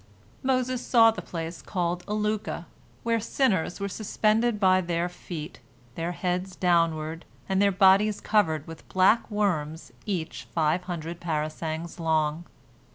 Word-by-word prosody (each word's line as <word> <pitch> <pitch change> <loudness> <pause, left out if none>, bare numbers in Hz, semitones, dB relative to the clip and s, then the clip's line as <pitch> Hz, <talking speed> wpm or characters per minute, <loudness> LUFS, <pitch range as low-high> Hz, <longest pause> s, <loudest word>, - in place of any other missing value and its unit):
Moses 255 -2 0
saw 225 -2 +6
the 220 - -6
place 165 0 -6
called 175 -2 -2
Alukah, 210 0 -2 0.4
where 230 0 +1
sinners 210 -7 0
were 200 - -2
suspended 215 +2 +1
by 185 -2 +4
their 170 0 -1
feet, 170 -3 -8 0.3
their 165 +5 -3
heads 180 +1 -2
downward, 165 -2 +1 0.2
and 190 0 +1
their 200 0 +4
bodies 195 +2 +4
covered 160 -8 +1
with 165 0 -11
black 190 +5 +3
worms, 160 - -1
each 175 -5 -3
five 165 +2 +1
hundred 170 -1 -5
parasangs 160 +1 -3
long. 160 0 0
180 Hz, 130 wpm, -27 LUFS, 165-210 Hz, 0.4 s, saw